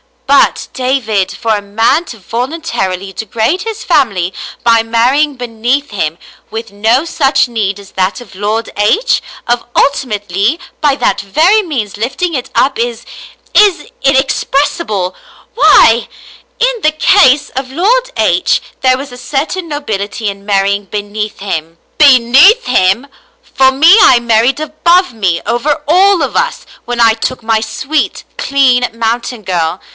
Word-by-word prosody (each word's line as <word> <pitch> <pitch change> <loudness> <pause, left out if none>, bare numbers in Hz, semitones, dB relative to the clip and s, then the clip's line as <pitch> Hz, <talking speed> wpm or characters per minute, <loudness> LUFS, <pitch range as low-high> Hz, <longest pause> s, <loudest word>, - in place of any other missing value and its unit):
But, 280 0 +2
David, 250 -7 -1
for 225 -1 -1
a 205 - -3
man 225 +11 0
to 235 - -10
voluntarily 220 - -4
degrade 225 - -2
his 445 0 -6
family 195 - +1 0.3
by 230 -1 +4
marrying 250 +6 +1
beneath 245 +3 -2
him, 160 -5 -3 0.3
with 225 0 -7
no 220 +7 +1
such 270 -6 +1
need 205 -4 -2
as 200 - -14
that 190 +4 -1
of 225 -6 -14
Lord 210 +4 -3
H, 390 - +2 0.2
of 240 0 -2
ulti 280 -1 +1
mately 205 - -1 0.2
by 290 -3 +2
that - - 0
very 320 - +2
means 250 - -4
lifting 260 +10 -2
it 255 -4 -4
up 265 -3 +1
is 235 -1 -3 0.3
— - - -30
is 410 -1 +3
— - - -14
inexpres 270 +1 +1
sible 195 - -3 0.2
— - - -27
why 235 - +5 0.3
—! - - -29
In - - +1
the 305 -3 +2
case 295 -5 +3
of 260 0 -5
Lord 455 - +1
H - - +1 0.2
there 255 -1 +2
was 275 0 -8
a 245 - -10
certain 315 +7 -3
nobility 215 -8 -4
in 200 0 -9
marrying 200 0 0
beneath 210 +1 -5
him." 165 -4 -5
" - - -42
Beneath 285 - +5
him! 210 +1 +1 0.4
For 265 - +2
me, 320 +9 +6
I 245 - +6
married 235 +4 +1
above 340 +2 +1
me, 185 -6 -1
over 290 +6 -1
all 370 +1 +4
of 270 - -4
us, - - -1 0.2
when 240 0 -2
I 225 -1 +5
took 235 +2 -4
my 225 -1 +1
sweet, 270 +7 -3
clean 255 -3 +2
mountain 230 0 -3
girl. 175 -1 -2
245 Hz, 155 wpm, -12 LUFS, 210-295 Hz, 0.4 s, me